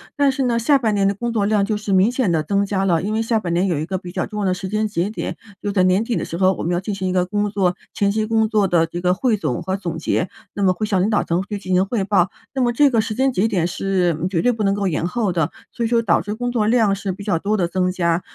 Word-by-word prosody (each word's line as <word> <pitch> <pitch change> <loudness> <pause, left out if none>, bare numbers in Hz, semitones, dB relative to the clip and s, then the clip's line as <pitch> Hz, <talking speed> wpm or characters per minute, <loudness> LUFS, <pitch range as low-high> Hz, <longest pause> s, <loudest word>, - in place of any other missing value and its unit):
但 285 -2 +3
是 270 0 -2
呢， 235 -2 +1
下 280 +4 +4
半 225 -5 0
年 200 -1 +2
的 200 - 0
工 235 +2 -3
作 205 -3 +1
量 210 -2 +2
就 215 - -1
是 210 -1 -4
明 195 +5 +4
显 250 -8 0
地 160 -2 +1
增 200 +4 +1
加 195 -1 -1
了， 170 -4 +2
因 205 +3 -3
为 220 +1 0
下 225 0 +1
半 175 -5 -4
年 180 +3 +2
有 170 -6 0
一 155 - -3
个 190 - -2
比 180 -1 -9
较 - - -2
重 210 - -6
要 - - 0
的 185 - +2
时 185 +1 -5
间 215 +1 0
节 195 -1 -1
点， 220 - -4 0.3
就 205 - -1
在 190 -2 +2
年 185 +4 +3
底 230 -1 -2
的 - - -1
时 170 - -5
候， 190 0 +3
我 - - -6
们 170 - -1
要 175 - +1
进 200 +2 -4
行 190 -1 -2
一 - - -1
个 180 -1 +1
工 205 +2 -1
作 190 -3 0 0.2
前 200 -1 +2
期 215 0 -1
工 225 -1 +2
作 215 -2 +2
的 170 -3 +3
这 170 +2 -6
个 180 +1 +2
汇 235 +1 +1
总 150 -11 -3
和 190 - -1
总 170 -4 -4
结， 165 +2 -1 0.2
那 200 - -4
么 185 -1 +4
会 215 +4 -2
向 195 -3 +1
领 200 - +1
导 210 - +2
层 170 +2 0
去 205 - -3
进 185 -2 -4
行 185 +1 +4
汇 200 0 -1
报， 190 -2 +2 0.2
那 265 - -1
么 240 -1 +2
这 280 +3 +4
个 230 -3 +3
时 215 -1 -4
间 265 0 +1
节 205 +1 +2
点 185 -6 0
是 185 -2 0
绝 175 -4 0
对 245 - +4
不 225 -2 -4
能 195 0 +2
够 200 -1 -1
延 165 0 -1
后 205 0 -1
的。 165 -4 0 0.2
所 235 - -4
以 225 - 0
说 230 -1 +2
导 175 -6 +3
致 205 +3 -4
工 245 +2 -2
作 220 -3 +1
量 220 -3 +3
是 195 -1 -3
比 195 +2 -8
较 195 -5 0
多 210 +4 0
地 185 - 0
增 185 0 0
加， 170 -1 +1
200 Hz, 350 characters per minute, -20 LUFS, 180-220 Hz, 0.3 s, 下